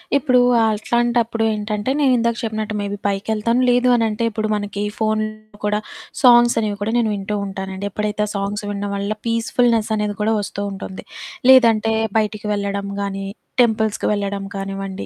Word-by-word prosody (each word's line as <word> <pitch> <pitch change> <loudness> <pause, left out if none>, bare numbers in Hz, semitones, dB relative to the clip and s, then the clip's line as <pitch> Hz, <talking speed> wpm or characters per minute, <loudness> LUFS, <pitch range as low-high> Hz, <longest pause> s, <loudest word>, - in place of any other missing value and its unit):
ఇప్పుడు 255 -3 +3 0.3
అట్లాంటప్పుడు 230 +1 0
ఏంటంటే, 210 +2 -3
నేను 275 -3 +4
ఇందాక 235 0 0
చెప్పినట్టు 215 -1 -3
మేబీ 205 0 -3
పైకెళ్తాను. 215 +4 0
లేదు 245 +1 +3
అని 230 - +2
అంటే 215 +2 -3
ఇప్పుడు 215 0 -2
మనకి 205 -1 -3 0.2
ఫోనుల్లో 215 -1 -2
కూడా 210 0 +1 0.4
సాంగ్స్ 240 -2 +6
అనేవి 210 -2 -2
కూడా 215 - -1
నేను 230 -2 +2
వింటూ 200 +1 -3
ఉంటానండి. 190 0 -5
ఎప్పుడైతే 210 +1 -1
ఆ - - -6
సాంగ్స్ 200 +1 -2
వినడం 205 0 -3
వల్ల, 200 +2 -2
పీస్‌ఫుల్‌నెసనేది 225 -2 +1
కూడా 220 +1 +2
వస్తూ 200 0 -5
ఉంటుంది. 190 -1 -7 0.5
లేదంటే 225 -4 +5 0.3
బయటికి 215 0 -3
వెళ్ళడం 200 0 -2
గానీ, 195 0 -3 0.4
టెంపుల్స్‌కి 220 -2 0
వెళ్ళడం 200 -1 -3
కానివ్వండి 195 0 -5
215 Hz, 150 wpm, -20 LUFS, 200-230 Hz, 0.5 s, సాంగ్స్